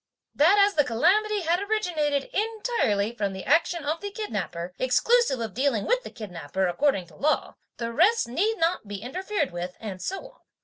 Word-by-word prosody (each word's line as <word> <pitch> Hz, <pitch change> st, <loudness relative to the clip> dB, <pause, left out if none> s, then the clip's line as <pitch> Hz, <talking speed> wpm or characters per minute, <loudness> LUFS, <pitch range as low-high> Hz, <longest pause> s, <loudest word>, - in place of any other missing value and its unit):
That 330 Hz, +8 st, +5 dB
as 405 Hz, 0 st, +5 dB
the 295 Hz, -, +4 dB
calamity 390 Hz, -, +2 dB
had 340 Hz, +1 st, +1 dB
originated 335 Hz, -10 st, 0 dB
entirely 420 Hz, -, 0 dB
from 200 Hz, -4 st, -2 dB
the 190 Hz, -, -6 dB
action 330 Hz, +2 st, +2 dB
of 310 Hz, +3 st, -1 dB
the 405 Hz, -, -4 dB
kidnapper, 185 Hz, -, -4 dB
exclusive 275 Hz, -, +3 dB
of 225 Hz, -4 st, -4 dB
dealing 255 Hz, -5 st, 0 dB
with -, -, +2 dB
the -, -, -8 dB
kidnapper 190 Hz, -4 st, -4 dB
according 195 Hz, +1 st, +1 dB
to -, -, -18 dB
law, 305 Hz, +2 st, 0 dB, 0.2 s
the 230 Hz, 0 st, -4 dB
rest 395 Hz, -, +3 dB
need 395 Hz, -, 0 dB
not 330 Hz, -, 0 dB
be 205 Hz, -, -5 dB
interfered 305 Hz, -, -3 dB
with, 175 Hz, +1 st, -5 dB
and 195 Hz, -4 st, -6 dB
so 390 Hz, +6 st, -4 dB
on. -, -, -29 dB
295 Hz, 180 wpm, -26 LUFS, -, 0.2 s, That